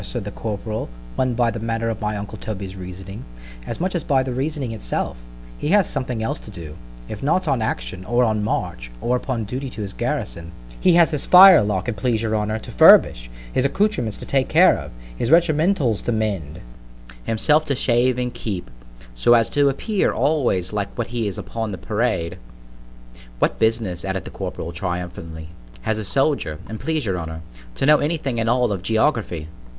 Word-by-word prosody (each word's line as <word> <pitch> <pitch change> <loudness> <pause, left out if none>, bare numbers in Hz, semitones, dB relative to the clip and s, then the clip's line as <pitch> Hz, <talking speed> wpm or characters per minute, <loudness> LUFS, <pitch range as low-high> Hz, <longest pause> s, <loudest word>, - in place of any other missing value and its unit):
said 115 0 -4
the 105 - -5
corporal, 110 - -4 0.3
won 130 -2 0
by 120 -1 +2
the 115 - -5
manner 115 +1 -2
of 115 -2 -3
my 105 0 -1
uncle 100 0 -6
Toby's 100 -3 -6
reasoning, 95 +2 -8 0.4
as - - -4
much 185 +2 -1
as 175 -3 -1
by 135 -2 +2
the 130 -1 -4
reasoning 135 -1 -2
itself, 110 -2 -3 0.4
he - - -3
has 195 +2 +4
something 125 -5 -3
else 110 - -2
to - - -12
do; 85 -6 -9 0.3
if 105 - -7
not 165 +7 +1
on 130 - +1
action, 90 - -3
or 120 +4 +2
a 110 -2 +2
march, 105 - -2
or 125 - 0
upon 125 -2 -2
duty 130 +6 -4
in - - -9
his 100 -3 -5
garrison—he 85 - -2
has 170 -1 +5
his 150 -3 -1
firelock, 165 - +7
an' 120 - 0
please 110 +2 -1
your 110 -1 0
honour, 105 +1 -1
to 110 - -9
furbish—his - - +4
accoutrements 140 - 0
to - - -8
take 135 -1 0
care - - +6
of—his - - -6
regimentals 160 - +3
to - - -2
mend—himself 80 - -2
to 140 -3 0
shave 125 0 +2
and 125 -1 -2
keep 95 -6 -4
clean, - - -21
so - - +4
as 115 -1 +2
to 145 -1 +3
appear 195 +9 0
always 120 - 0
like 100 -1 -2
what 120 - -2
he 115 -2 -2
is 100 - -4
upon 115 -2 -4
the 95 - -5
parade; 105 -4 -1 1.0
what - - 0
business, 110 -6 0
added 95 -1 -3
the - - -8
corporal 85 - -5
triumphantly, 90 -3 -5 0.3
has 110 -1 -1
a - - -3
soldier, 135 - 0
an' 110 +1 -6
please 155 0 -1
your 95 -4 -1
honour, 80 -1 -6 0.3
to - - 0
know 150 +1 +6
any 160 +3 0
thing 135 -6 -3
at 115 0 0
all 125 -1 +2
of 95 -3 -2
_geography? 110 - 0
110 Hz, 185 wpm, -22 LUFS, 90-130 Hz, 1.0 s, firelock